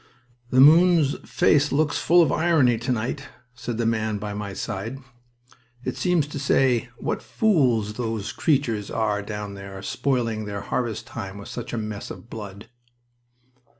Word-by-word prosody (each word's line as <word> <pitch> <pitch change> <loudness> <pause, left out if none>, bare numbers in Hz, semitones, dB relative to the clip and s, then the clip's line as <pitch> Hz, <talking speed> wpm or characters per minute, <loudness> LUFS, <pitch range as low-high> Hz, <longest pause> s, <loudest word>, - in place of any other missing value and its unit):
"The 130 - +3
moon's 160 0 +6
face 145 -1 +3
looks 145 +1 +1
full 175 +1 +5
of - - +1
irony 150 -9 +3
to 120 +2 -2
night," 125 +4 -2 0.3
said 125 -2 -5
the 115 - 0
man 110 -2 0
by 105 0 -5
my 100 -1 -5
side. 105 +6 -4 0.9
"It - - -2
seems 180 -5 +1
to 145 - -5
say, 130 -3 +2
`What - - -2
fools 125 - +2
those 110 -2 -3
creatures 120 -6 0
are 105 -2 0
down 105 -1 -6
there, 100 -1 -8
spoiling 115 -6 -1
their 100 -1 -4
harvest 120 -2 -2
time 100 -3 -7
with 100 - -9
such - - -6
a 120 - -3
mess 105 -2 -5
of 115 - -10
blood!'" 105 -1 -8
115 Hz, 155 wpm, -24 LUFS, 105-140 Hz, 0.9 s, moon's